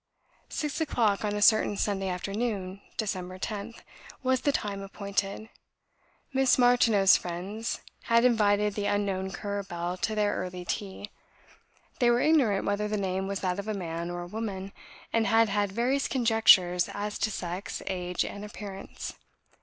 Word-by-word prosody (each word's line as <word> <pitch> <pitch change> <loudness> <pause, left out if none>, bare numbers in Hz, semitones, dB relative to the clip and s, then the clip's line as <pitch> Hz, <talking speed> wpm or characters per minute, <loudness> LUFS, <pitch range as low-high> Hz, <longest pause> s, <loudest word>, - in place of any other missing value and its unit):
Six 300 +1 -3
o'clock, 220 -10 +1
on 205 -1 -1
a 205 - +1
certain 215 -1 +5
Sunday 195 -2 0
afternoon 195 0 -3 0.2
(Dec. 185 -4 -3
10th), 210 +3 -5 0.4
was 260 -1 +2
the 285 - +2
time 200 -6 -2
appointed. 200 +1 -3 0.9
Miss 265 -1 +4
Martineau's 240 -6 +5
friends 190 +6 -4 0.2
had 230 +1 +4
invited 210 -3 +3
the 205 0 -2
unknown 195 -2 0
Currer 200 +1 -3
Bell 175 -1 -4
to 215 +4 -1
their 210 -1 +2
early 180 -1 -5
tea; 205 +2 -4 0.9
they 240 -2 +4
were 240 0 +4
ignorant 255 -10 +3
whether 205 +1 0
the 210 0 -1
name 190 -1 -1
was 200 -1 -3
that 185 0 -1
of 200 - -5
a 215 - -1
man 170 -2 -4
or 175 0 -4
a - - -8
woman; 195 -1 -5 0.4
and 225 -1 +2
had 225 -1 +4
had 205 -1 0
various 250 +6 +1
conjectures 220 -8 +4
as 205 +1 -4
to 215 - +1
sex, 180 -1 -5
age, 180 -2 -1
and 200 - -6
appearance. 205 -2 -7
205 Hz, 155 wpm, -28 LUFS, 190-225 Hz, 0.9 s, certain